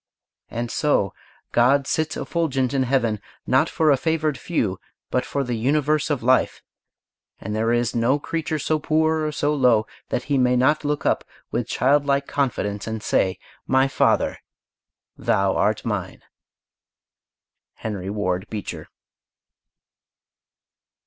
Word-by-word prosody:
And 120 0 -4
so 100 - +1 0.4
God 135 +4 +4
sits 155 +2 -1
effulgent 135 -6 -1
in 135 - +2
Heaven, 115 -6 +1 0.2
not - - +3
for 155 -2 +3
a 140 - +4
favored 155 0 0
few, 110 - -2 0.3
but 125 - +1
for 140 - -1
the 125 -2 -3
universe 145 +6 +1
of 145 -6 -1
life; 130 +2 +2 0.8
and 105 +2 -4
there 115 +1 +1
is 120 0 +1
no 120 +4 +3
creature 155 +1 -3
so 155 +1 0
poor 160 +1 +1
or 155 - -1
so 150 0 0
low 125 -6 +3 0.2
that 125 - -1
he 140 0 0
may 125 0 +3
not 130 +6 +3
look 145 -1 -2
up - - +2 0.3
with - - -1
child 145 +2 +2
like 140 0 +2
confidence 105 -9 -2
and 110 -1 -4
say, 95 0 +1 0.3
"My 130 +1 +4
Father! 135 - +1 0.8
Thou 95 0 +1
art 110 +1 +1
mine." 105 -6 -3 1.5
HENRY 100 -4 -5
WARD 100 -1 -2
BEECHER. 105 -3 -6
130 Hz, 135 wpm, -23 LUFS, 110-150 Hz, 1.5 s, God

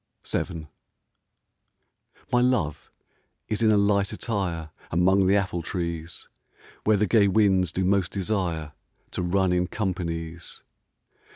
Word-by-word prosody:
VII 80 -4 -3 1.7
My 120 - +5
love 110 - 0 0.6
is 105 +1 -2
in 110 - +4
a 105 - +5
light 100 -1 +2
attire 90 -8 -3 0.2
Among 95 +3 +3
the 100 - +4
apple 95 -3 0
trees, 85 -1 -4 0.6
Where 105 -1 +4
the 105 - +2
gay 105 0 +4
winds 95 -3 +3
do 95 +3 -1
most 95 -2 +2
desire 90 -6 -2 0.4
To - - -2
run 95 +1 +1
in 90 0 +1
companies. 85 -5 -4
95 Hz, 120 wpm, -26 LUFS, 85-100 Hz, 1.7 s, My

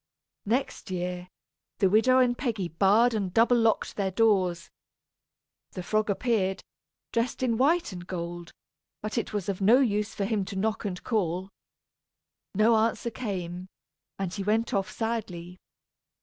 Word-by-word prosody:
Next 250 +1 -1
year, 180 0 -3 0.5
the 195 - +3
widow 225 +6 +4
and 250 -1 +4
Peggy 220 -9 -2
barred 205 +8 +4
and 200 -4 -1
double 230 +5 +4
locked 225 -1 +1
their 195 -2 0
doors. 185 -5 +1 1.0
The 185 - -5
frog 215 +3 0
appeared, 200 -3 0 0.5
dressed 230 +2 -1
in 235 -3 +2
white 320 +5 +2
and 175 -1 -8
gold, 175 -1 -5 0.5
but 215 - -4
it - - -5
was 205 -4 -3
of 200 -1 -3
no 225 +7 +6
use 210 -5 0
for 200 - -1
him 210 -1 0
to 195 - -7
knock 215 +3 -1
and 180 -3 -4
call. 190 -4 -1 1.0
No 220 +3 +4
answer 230 +1 0
came, 185 -6 -5 0.5
and 190 -2 -3
he 200 - -4
went 220 +3 0
off 195 -2 0
sadly. 185 -6 -4
205 Hz, 150 wpm, -27 LUFS, 185-230 Hz, 1.0 s, no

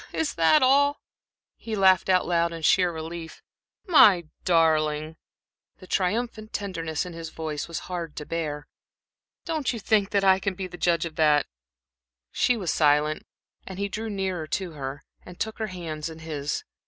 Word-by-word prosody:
"Is 320 - -1
that 170 - +4
all?" 285 +2 +4 0.6
He 225 -1 -5
laughed 190 -1 +4
out 185 -1 +4
loud 170 -1 +1
in 165 -1 -7
sheer 180 +2 +4
relief. 160 0 -7 0.4
"My 210 - +6 0.2
darling," 155 -2 +2 0.6
the 185 - -13
triumphant 215 +4 -2
tenderness 165 -6 -3
in 180 - -8
his 165 -1 -7
voice 155 -2 -5
was 170 - -5
hard 170 -4 -5
to 150 - -6
bear 150 -3 -4 0.8
"don't 315 -5 -1
you 240 - -4
think 210 -1 +2
that 200 -1 +1
I 190 -1 +5
can 190 -1 -3 0.2
judge 170 -1 +2
of 160 -2 -8
that?" 150 -2 +4 0.9
She 250 - +2
was 185 -7 -1
silent, 150 0 +2 0.4
and 190 - -7
he 200 +1 -2
drew 220 +3 -4
nearer 190 -5 -3
to 185 +1 -3
her 140 -2 -6 0.2
and 180 -1 -13
took 220 0 -3
her 220 - -1
hands 165 -5 -5
in 160 - -10
his. 150 -3 -4
175 Hz, 165 wpm, -26 LUFS, 160-200 Hz, 0.9 s, My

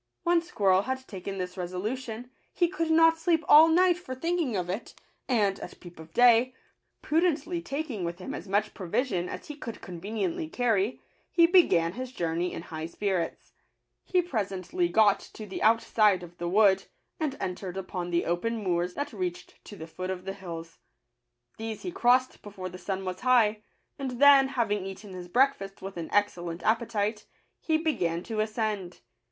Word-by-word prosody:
When 345 -1 +3
Squirrel 200 - +2
had 260 +3 -4
taken 195 0 -6
this 180 -1 -4
resolution, 220 +7 -4 0.2
he 350 - +2
could 330 -2 -2
not 325 0 +5
sleep 330 -1 +1
all 310 +2 +9
night 355 +2 +4
for 260 -8 -7
thinking 330 -4 -1
of 180 -2 -1
it; 190 +6 -5 0.3
and, 205 -6 +2
at - - -9
peep 175 -2 -13
of 160 0 -12
day, 245 +3 +5 0.5
prudently 330 +1 +1
taking 275 - -4
with 170 0 -3
him 185 - -6
as 185 - -7
much 205 +2 0
provision 190 -1 -1
as - - -7
he 300 - -7
could 235 -6 -7
con 175 -2 -9
veniently 195 -6 -3
carry, 230 -2 +1 0.3
he 335 - +5
began 255 - +4
his 255 +3 -6
journey 170 -3 -1
in - - -6
high 160 -1 -6
spirits. 185 -1 -3 0.5
He 360 -1 +1
presently 225 - -2
got 215 -6 +4 0.2
to 215 - -7
the 195 - -6
out 225 +1 +4
side 205 -5 +3
of 175 0 -11
the 175 0 -2
wood, 195 0 +4 0.3
and 295 -4 -2
entered 185 0 -4
upon 185 -2 -4
the 170 0 0
open 200 +7 -1
moors 180 -3 -1
that 285 -2 -4
reached 180 -3 -5
to 205 - -10
the 160 - -8
foot 185 +3 -6
of 185 -1 -4
the 195 - -3
hills. 165 -4 -8 0.8
These 225 -1 -5
he 360 - -3
crossed 255 -2 +2
before 195 -3 -7
the 180 +1 -10
sun 190 0 -4
was 185 0 -4
high; 225 -4 +3 0.4
and 255 -3 -4
then, 280 -1 +8
having 220 -7 -1
eaten 195 +1 -9
his 180 -1 -7
breakfast 220 -3 +1
with 195 0 -6
an 170 -2 -5
excellent 175 -4 0
appetite, 220 -2 0 0.3
he 315 -1 +1
began 185 - -1
to 220 0 -4
ascend. 215 -4 -2
210 Hz, 180 wpm, -28 LUFS, 185-260 Hz, 0.8 s, all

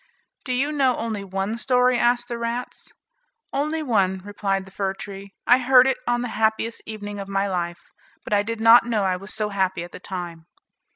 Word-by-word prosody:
"Do 255 - -3
you 275 +4 0
know 270 -4 +2
only 220 -3 -3
one 195 +3 -3
story?" 250 -1 +3
asked 240 0 +2
the 235 -1 -4
rats. 235 +1 -4 0.6
"Only 305 +3 -1
one," 195 -8 +1
replied 195 -2 -2
the 190 - -15
fir 190 0 -2
tree; 200 0 -9
"I 245 +1 +6
heard 255 0 +6
it 265 -1 +1
on 240 0 +1
the 245 - -3
happiest 220 +1 +1
evening 205 -2 -6
of 195 - -6
my 195 0 0
life; 175 -2 -4 0.3
but - - -4
I 205 - +4
did 225 +2 -4
not 230 +2 +8
know 220 -4 +1
I 185 -1 +1
was 195 +3 -8
so 215 -1 -2
happy 190 -3 -1
at 175 - -10
the - - -9
time." 175 -3 -7
215 Hz, 205 wpm, -23 LUFS, 195-245 Hz, 0.6 s, not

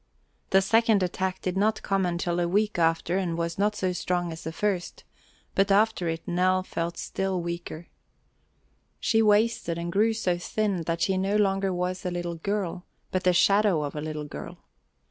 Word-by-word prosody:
The 195 0 +4
second 225 -1 +3
attack 185 +1 -2
did 185 -1 -1
not 215 +2 +1
come 195 -2 +1
until 175 0 -1
a 175 - +1
week 205 +1 +1
after 165 +2 +2
and 170 -3 -2
was 170 +2 -3
not 210 +1 +2
so 185 -2 -1
strong 175 -1 -1
as 160 +1 -8
the 160 - -4
first, 185 +1 -2 0.5
but 195 +1 +2
after 205 -4 +3
it 165 0 -5
Nell 185 +1 +2
felt 170 -1 -4
still 190 -1 -2
weaker. 170 -1 -5 1.1
She 225 -2 +2
wasted 210 -5 +2
and 170 0 -3
grew 215 +5 +3
so 180 -6 -1
thin 200 0 -1
that 165 0 -1
she 190 -1 +1
no 195 +2 0
longer 195 -2 +2
was 180 +1 -2
a 180 - -1
little 175 -1 -3
girl, 190 -1 -2 0.3
but 185 -1 -1
the 180 - +6
shadow 195 -2 +3
of 145 - -5
a 150 - -3
little 155 -1 -4
girl. 70 - -8
185 Hz, 185 wpm, -27 LUFS, 170-200 Hz, 1.1 s, the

